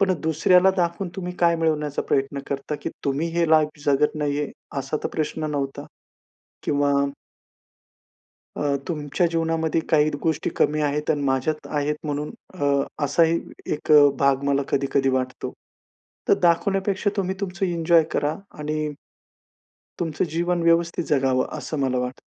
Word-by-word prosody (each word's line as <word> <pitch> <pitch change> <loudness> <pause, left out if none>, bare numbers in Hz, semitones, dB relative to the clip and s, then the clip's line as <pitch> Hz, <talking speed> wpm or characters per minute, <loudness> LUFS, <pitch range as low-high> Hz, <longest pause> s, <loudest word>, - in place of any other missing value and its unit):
पण 195 -1 +3
दुसऱ्याला 180 +4 +4
दाखवून 175 +1 0
तुम्ही 180 -1 -4
काय 170 -1 +4
मिळवण्याचा 150 -3 0
प्रयत्न 135 +1 0
करता 140 +2 -3
की - - -3
तुम्ही 145 +4 0
हे 170 -2 +2
लाईफ 155 -1 +3
जगत 145 +2 +2
नाही 145 -1 0
आहे, 145 - -3 0.3
असा 135 +3 -2
तर - - +1
प्रश्न 155 0 -2
नव्हता? 140 -2 -3 0.8
किंवा 145 0 +1 1.6
अ, 145 -1 0
तुमच्या 150 0 -1
जीवनामध्ये 165 -1 0
काही 155 -1 +4
गोष्टी 160 -1 0
कमी 150 0 +2
आहेत 150 +1 -1
आणि 145 -2 -1
माझ्यात 135 +3 0
आहेत, 150 0 -1
म्हणून 150 0 -3 0.2
अ, 160 -6 -2 0.4
असा 165 +4 +3
ही 165 +1 +2 0.3
एक 150 - -3 0.3
भाग 140 0 +3
मला 140 0 +2
कधी-कधी 135 0 +1
वाटतो. 130 -1 -2 0.7
तर - - +6
दाखवण्यापेक्षा 195 +3 +2
तुम्ही 190 -1 0
तुमचं 195 0 -2
एन्जॉय 170 -1 +3
करा. 150 +2 0 0.2
आणि 150 0 -2 1.1
तुमचं 165 -2 -1
जीवन 175 +2 0
व्यवस्थित 170 +1 +2
जगावं, 130 -3 +2
असं 155 - -4
मला 130 -2 +1
वाटतं. 125 +1 -3
155 Hz, 140 wpm, -23 LUFS, 140-170 Hz, 1.6 s, तर